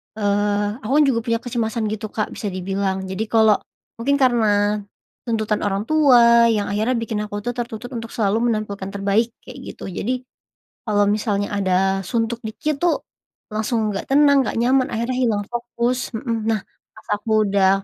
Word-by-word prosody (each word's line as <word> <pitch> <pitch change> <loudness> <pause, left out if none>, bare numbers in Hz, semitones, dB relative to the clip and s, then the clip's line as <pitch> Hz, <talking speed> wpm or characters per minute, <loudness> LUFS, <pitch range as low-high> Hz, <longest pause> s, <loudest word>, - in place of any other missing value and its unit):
eee, 205 +1 0
aku 240 0 -5
kan 300 - +6
juga 230 -3 +1
punya 230 -1 +1
kecemasan 230 -2 -2
gitu 215 0 -4
Kak 215 0 -3
bisa 210 - -5
dibilang 190 +1 -2
jadi 190 +3 -3
kalau 220 -2 +4 0.4
mungkin 280 +4 +2
karena, 210 -4 +3 0.5
tuntutan 215 -2 0
orang 195 +1 -1
tua 240 -6 +6
yang 205 -1 -1
akhirnya 220 +5 +1
bikin 225 -2 -2
aku 205 0 -5
tuh 245 - -1
tertuntut 240 0 -5
untuk 225 0 -7
selalu 210 -1 +1 0.2
menampilkan 200 -3 -4
terbaik 200 +4 +1
kayak - - -11 0.2
gitu - - -7
jadi, 250 +7 -2 0.7
kalau 205 -1 +2
misalnya 205 -1 0
ada 190 0 +2
suntuk 230 -1 -1
dikit 285 +6 -3
tuh, 350 -1 +1 0.5
langsung 215 0 -1
nggak 195 - -4
tenang, 280 -2 +5
nggak - - -2
nyaman, 255 +2 +3
akhirnya 235 +3 -1
hilang 220 -5 +1
fokus 240 +1 -2
mhm, 225 -2 -2
nah 220 -2 +1 0.4
pas 220 - -17
aku 215 0 +1
udah 195 -1 +3
220 Hz, 165 wpm, -21 LUFS, 205-240 Hz, 0.7 s, kan